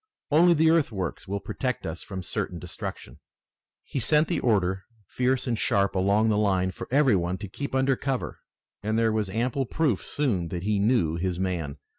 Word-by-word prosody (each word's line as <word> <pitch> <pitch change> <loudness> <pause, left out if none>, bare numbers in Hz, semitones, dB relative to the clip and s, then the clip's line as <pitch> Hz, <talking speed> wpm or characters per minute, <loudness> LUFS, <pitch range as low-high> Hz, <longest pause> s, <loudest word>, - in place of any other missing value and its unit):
Only 170 +3 +6
the 160 +1 +4
earthworks 110 - -1
will 100 +1 -2
protect 125 +4 -3
us 80 +2 -5
from 95 -2 -6
certain - - -3
destruction." 60 +4 -7 0.6
He 135 - -4
sent 150 +6 +3
the 175 - 0
order, 95 -5 +1 0.2
fierce 125 +6 0
and 120 - 0
sharp, 100 0 +2
along 100 +4 +2
the 105 -1 +2
line, 95 -3 +1
for - - -8
every 135 -4 +4
one 90 0 -1
to 100 +2 -7
keep 140 +8 -5
under 130 0 +3
cover, 135 -1 -3 0.4
and 110 +1 -1
there 115 -1 +3
was 110 -2 -1
ample 125 +5 -1
proof 145 - 0
soon 110 - -1
that 85 +1 -5
he 105 0 +1
knew 100 -7 +2
his 90 0 -2
man. 85 -6 -2
105 Hz, 185 wpm, -26 LUFS, 95-130 Hz, 0.6 s, Only